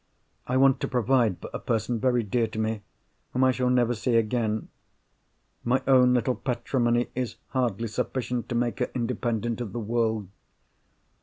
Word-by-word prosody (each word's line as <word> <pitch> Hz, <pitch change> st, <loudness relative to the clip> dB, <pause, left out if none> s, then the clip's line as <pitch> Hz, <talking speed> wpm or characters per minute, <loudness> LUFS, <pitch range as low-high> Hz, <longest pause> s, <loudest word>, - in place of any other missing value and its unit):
I 125 Hz, -, +1 dB
want 135 Hz, 0 st, +5 dB
to -, -, -2 dB
provide 125 Hz, -5 st, +2 dB
for -, -, -9 dB
a -, -, -3 dB
person—very 120 Hz, +2 st, 0 dB
dear 115 Hz, +3 st, 0 dB
to 110 Hz, -, -9 dB
me—whom 110 Hz, +3 st, -4 dB
I 130 Hz, -, +5 dB
shall 125 Hz, 0 st, 0 dB
never 120 Hz, -1 st, +3 dB
see 120 Hz, +2 st, 0 dB
again. 110 Hz, -1 st, 0 dB, 0.9 s
My 130 Hz, +2 st, +1 dB
own 125 Hz, -2 st, +6 dB
little 125 Hz, +1 st, +1 dB
patrimony 120 Hz, -1 st, 0 dB
is 125 Hz, -2 st, -3 dB
hardly 120 Hz, -4 st, -1 dB
sufficient 125 Hz, +2 st, -3 dB
to 120 Hz, -, -2 dB
make 120 Hz, +1 st, 0 dB
her 125 Hz, -, 0 dB
independent 120 Hz, -1 st, -1 dB
of 105 Hz, -5 st, -5 dB
the 120 Hz, -, -3 dB
world. 110 Hz, -2 st, 0 dB
120 Hz, 155 wpm, -26 LUFS, 115-125 Hz, 0.9 s, own